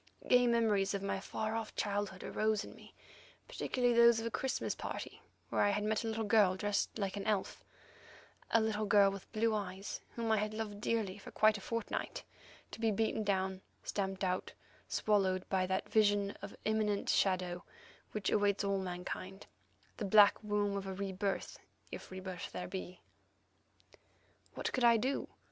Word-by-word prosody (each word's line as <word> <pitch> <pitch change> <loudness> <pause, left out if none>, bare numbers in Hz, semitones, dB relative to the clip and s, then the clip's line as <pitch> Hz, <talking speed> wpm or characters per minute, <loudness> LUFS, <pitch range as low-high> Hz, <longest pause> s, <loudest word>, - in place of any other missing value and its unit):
Gay 250 -1 +5
memories 215 -4 +2
of 195 - -3
my 195 -1 -1
far 215 +3 -3
off 225 -1 -4
childhood 200 -2 -2
arose 215 -1 0
in - - -10
me, - - -15 0.6
particularly 245 -1 0
those 235 -1 +6
of 225 - -4
a 230 - -2
Christmas 265 - -1
party - - -6 0.3
where - - +1
I 205 - +4
had 205 +1 0
met 215 +1 0
a - - -3
little 225 0 -1
girl 205 -3 +4
dressed 205 +2 -1
like 200 -1 -2
an 200 - -4
elf, 210 -3 -1 0.9
a 230 - +4
little 215 -1 0
girl 200 -1 +6
with 195 -1 -9
blue 225 0 +1
eyes 195 -1 -4
whom 230 -1 -1
I 220 - +4
had 215 +1 -1
loved 210 -2 -5
dearly 210 -4 -1
for - - -10
quite 215 0 +4
a - - -13
fortnight, 230 +1 -3 0.5
to - - -9
be 225 -1 +2
beaten 220 +1 0
down, 190 -2 0 0.2
stamped 195 -1 -2
out, 185 0 -1 0.4
swallowed 190 -3 +1
by 185 -1 +1
that 190 0 -1
vision 205 -2 +3
of 200 - -6
the - - -15
imminent 215 -2 +1
shadow 180 -2 +1 0.5
which 210 -3 -1
awaits 205 0 +2
all 200 -1 +1
mankind, 185 +1 -5 0.5
the - - -4
black 205 +2 +6
womb 205 -1 0
of 195 0 -5
a 190 - -3
re 195 0 -3
birth, 195 +1 -3 0.3
if - - -8
re 185 - -7
birth 185 -2 -6
there 180 - -4
be. 185 -1 -6 1.5
What - - -3
could 255 - 0
I 235 -1 +7
do? 260 +5 -1
205 Hz, 180 wpm, -34 LUFS, 190-220 Hz, 1.5 s, I